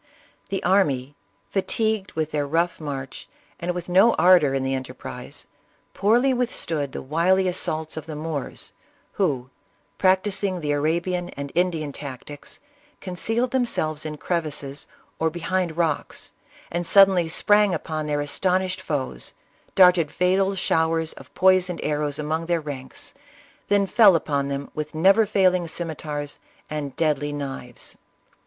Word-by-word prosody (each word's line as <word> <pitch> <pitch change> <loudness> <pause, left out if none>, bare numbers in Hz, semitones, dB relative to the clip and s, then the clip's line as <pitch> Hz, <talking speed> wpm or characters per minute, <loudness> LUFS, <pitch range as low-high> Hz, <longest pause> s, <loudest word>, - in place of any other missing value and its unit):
The 195 0 -2
army, 145 -8 +2 0.4
fatigued 215 +1 0
with 155 -1 -2
their 145 -1 -1
rough 165 +4 0
march, 140 -3 -6 0.3
and 175 +1 -2
with 180 -1 -5
no 195 +6 +5
ardor 175 -7 +5
in 135 - 0
the 135 0 -1
enterprise, 130 -1 -6 0.5
poorly 240 +7 +3
withstood 165 - -1
the - - -6
wily 175 +7 +2
assaults 160 -3 -1
of 160 - -6
the 155 - -6
Moors, 150 -2 -4 0.4
who, 135 -10 -1 0.5
practising 190 0 +2
the 150 -3 -2
Arabian 170 +4 0
and 140 0 -5
Indian 165 -4 0
tactics, 140 +1 -8 0.4
concealed 225 +7 -1
themselves 155 - +1
in 155 -1 -5
crevices 150 -4 -3 0.3
or 160 - +2
behind 175 0 -2
rocks, 165 -4 -1 0.4
and 175 0 -2
suddenly 190 -4 +6
sprang 205 +4 +4
upon 155 -2 -3
their 145 -1 0
astonished 185 +5 0
foes, 135 - -3 0.4
darted 180 -4 +6
fatal 190 +3 +2
showers 160 -2 +1
of - - -14
poisoned 185 -1 +4
arrows 150 -1 -1
among 160 +2 -2
their 170 -1 +1
ranks, 140 -4 -7 0.5
then 205 -1 +3
fell 200 -2 +6
upon 140 -3 0
them 140 0 -4
with 155 0 -5
never 195 +7 +5
failing 185 -4 +2
scimeters 150 -3 -4 0.3
and 145 -3 -4
deadly 150 -2 0
knives. 135 -4 -6
165 Hz, 135 wpm, -24 LUFS, 145-185 Hz, 0.5 s, suddenly